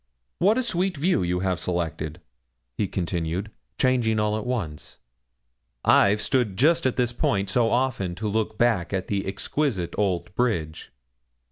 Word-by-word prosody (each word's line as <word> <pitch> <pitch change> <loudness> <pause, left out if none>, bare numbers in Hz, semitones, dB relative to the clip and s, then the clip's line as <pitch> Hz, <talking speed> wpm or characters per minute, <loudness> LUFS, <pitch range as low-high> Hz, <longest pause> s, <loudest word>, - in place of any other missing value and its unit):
What 210 +5 +4
a 255 - +1
sweet 185 -5 -1
view 170 - +2
you 90 0 0
have 95 -2 0
selected,' 80 -2 -3 0.6
he 100 - 0
continued, 90 +2 -2 0.3
changing 120 -4 +2
all 105 0 +1
at 110 +2 -4
once. 90 -13 -4 0.9
'I've 105 +2 +5
stood 120 -8 0
just 160 +3 +4
at 130 - -1
this 120 -2 0
point 100 -4 0
so 120 -3 +3
often 120 -8 0
to 110 +3 -3
look 110 +1 -1
back 110 -7 +1
at 95 -1 -2
that 100 -1 -1
exquisite 100 - -1
old 95 -4 0
bridge. 85 -10 -1
105 Hz, 150 wpm, -25 LUFS, 90-125 Hz, 0.9 s, I've